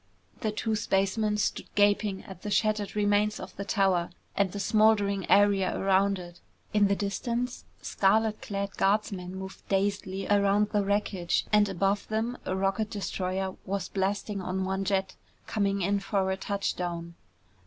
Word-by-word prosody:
The 215 Hz, -, -1 dB
two 220 Hz, +1 st, -1 dB
spacemen 210 Hz, +1 st, +1 dB
stood 210 Hz, -, -1 dB
gaping 205 Hz, -1 st, +2 dB
at 190 Hz, -2 st, -11 dB
the 210 Hz, -, -4 dB
shattered 210 Hz, 0 st, +1 dB
remains 210 Hz, 0 st, +2 dB
of -, -, -9 dB
the 200 Hz, -, -4 dB
tower 190 Hz, -4 st, +1 dB, 0.3 s
and 200 Hz, -2 st, +1 dB
the 205 Hz, -, -5 dB
smoldering 205 Hz, -2 st, +3 dB
area 200 Hz, -2 st, +4 dB
around 195 Hz, +1 st, +3 dB
it. 175 Hz, -1 st, -10 dB, 0.3 s
In 210 Hz, -1 st, +4 dB
the 200 Hz, -, +2 dB
distance, 235 Hz, +5 st, -3 dB, 0.2 s
scarlet 215 Hz, +2 st, +2 dB
clad 200 Hz, -1 st, -4 dB
guardsmen 195 Hz, -2 st, 0 dB
moved 190 Hz, 0 st, -8 dB
dazedly 195 Hz, -1 st, -1 dB
around 205 Hz, 0 st, +3 dB
the 205 Hz, -2 st, +2 dB
wreckage 195 Hz, -3 st, 0 dB
and 210 Hz, -1 st, +5 dB
above 195 Hz, +2 st, 0 dB
them 225 Hz, +3 st, -1 dB
a 185 Hz, -, 0 dB
rocket 195 Hz, +3 st, 0 dB
destroyer 190 Hz, -2 st, -3 dB
was 195 Hz, -1 st, -3 dB
blasting 200 Hz, +1 st, -1 dB
on 185 Hz, +1 st, -2 dB
one 190 Hz, +1 st, -2 dB
jet, 190 Hz, -1 st, 0 dB, 0.3 s
coming 200 Hz, -2 st, 0 dB
in 200 Hz, +2 st, +1 dB
for 195 Hz, -1 st, 0 dB
a -, -, 0 dB
touchdown. 175 Hz, -4 st, -3 dB
200 Hz, 155 wpm, -28 LUFS, 190-210 Hz, 0.3 s, and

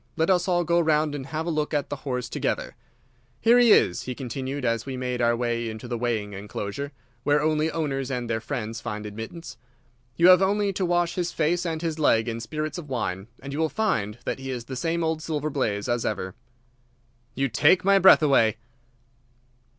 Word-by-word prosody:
Let 160 Hz, +3 st, +2 dB
us 180 Hz, 0 st, +2 dB
all 175 Hz, -1 st, +2 dB
go 170 Hz, +1 st, +2 dB
round 155 Hz, -2 st, +2 dB
and 135 Hz, -2 st, -5 dB
have 155 Hz, +3 st, -3 dB
a 170 Hz, -, -1 dB
look 150 Hz, -1 st, -1 dB
at 145 Hz, -, -1 dB
the 145 Hz, -, -2 dB
horse 125 Hz, -3 st, -3 dB
together. -, -, -2 dB, 0.6 s
Here 235 Hz, +2 st, +5 dB
he 240 Hz, -2 st, +6 dB
is," 90 Hz, -, +4 dB
he 125 Hz, -, -5 dB
continued, 135 Hz, +2 st, -4 dB
as 115 Hz, -1 st, 0 dB
we 130 Hz, 0 st, -5 dB
made 125 Hz, -1 st, -2 dB
our 120 Hz, 0 st, +3 dB
way 120 Hz, -1 st, -1 dB
into 110 Hz, +2 st, -7 dB
the 120 Hz, -, -3 dB
weighing 110 Hz, -4 st, -2 dB
enclosure, 105 Hz, +7 st, -5 dB, 0.3 s
where 145 Hz, +3 st, +2 dB
only 155 Hz, +1 st, +1 dB
owners 140 Hz, -5 st, -2 dB
and 125 Hz, -3 st, -3 dB
their 110 Hz, -1 st, -1 dB
friends 115 Hz, -2 st, -4 dB
find 105 Hz, -2 st, -5 dB
admittance. 115 Hz, +6 st, -8 dB, 0.6 s
"You 170 Hz, +2 st, +6 dB
have 185 Hz, 0 st, +8 dB
only 200 Hz, +1 st, +1 dB
to 190 Hz, 0 st, -1 dB
wash 175 Hz, -1 st, +1 dB
his 175 Hz, -1 st, -2 dB
face 170 Hz, +3 st, 0 dB
and 160 Hz, 0 st, -3 dB
his 160 Hz, -1 st, -2 dB
leg 115 Hz, -6 st, +3 dB
in 115 Hz, -1 st, -3 dB
spirits 155 Hz, +8 st, -4 dB
of 150 Hz, -4 st, -10 dB
wine, 95 Hz, -6 st, -3 dB, 0.2 s
and 140 Hz, 0 st, -6 dB
you 145 Hz, -, -3 dB
will 160 Hz, -1 st, +2 dB
find 115 Hz, -, -1 dB
that -, -, -2 dB
he 135 Hz, 0 st, -6 dB
is 125 Hz, -3 st, -4 dB
the 130 Hz, -, -6 dB
same 165 Hz, +6 st, -1 dB
old 160 Hz, -1 st, -1 dB
Silver 155 Hz, -2 st, -2 dB
Blaze 105 Hz, -7 st, -1 dB
as 120 Hz, -1 st, 0 dB
ever." 95 Hz, -3 st, -3 dB, 1.0 s
"You 135 Hz, +1 st, +1 dB
take 145 Hz, -, +3 dB
my 195 Hz, 0 st, +5 dB
breath 190 Hz, -3 st, +7 dB
away!" 115 Hz, -7 st, +4 dB
140 Hz, 205 wpm, -25 LUFS, 120-165 Hz, 1.0 s, have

